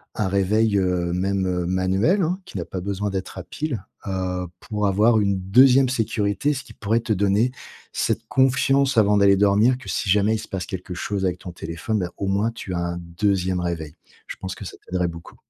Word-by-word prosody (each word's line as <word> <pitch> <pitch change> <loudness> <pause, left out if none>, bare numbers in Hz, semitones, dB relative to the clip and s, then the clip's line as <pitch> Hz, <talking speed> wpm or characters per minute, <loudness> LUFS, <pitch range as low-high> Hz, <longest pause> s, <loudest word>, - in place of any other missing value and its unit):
un 105 - 0
réveil, 100 +3 +2
heu, 90 -2 0
même, 95 +1 0
heu, 90 -1 -1
manuel, 95 - +2
hein, 180 +4 -1
qui - - -8
n'a 85 - -3
pas 95 - -5
besoin 100 +2 -2
d'être 95 -1 -5
à - - -5
piles, 130 -11 -4 0.2
heu, 90 -1 -2
pour 105 -2 -2
avoir 110 +4 +4
une 100 -2 +1
2me 125 +7 +5
sécurité. 115 +2 0
Ce 130 - -5
qui - - -14
pourrait 110 +2 0
te 115 -1 -1
donner 100 +5 +2 0.4
cette - - -1
confiance, 135 0 +2
avant 105 -1 +5
d'aller 100 -1 +5
dormir, 105 +5 +4
que 130 - -13
si 100 - -2
jamais 105 +3 +3
il - - -3
se - - -8
passe 95 -2 -3
quelque 90 -1 -6
chose 95 +2 -3
avec 90 -1 -1
ton 90 - -8
téléphone, 85 +6 -3
bah, 90 - -2
au 100 - -3
moins, 100 +4 +1
tu 100 -5 -7
as 85 - -1
un 85 0 -2
2me 90 +1 -1
réveil. 80 -3 -4 0.3
Je - - -6
pense 95 0 -6
que - - -9
ça - - -8
t'aiderait 90 -1 0
beaucoup. 85 0 -9
100 Hz, 215 wpm, -23 LUFS, 90-110 Hz, 0.4 s, 2me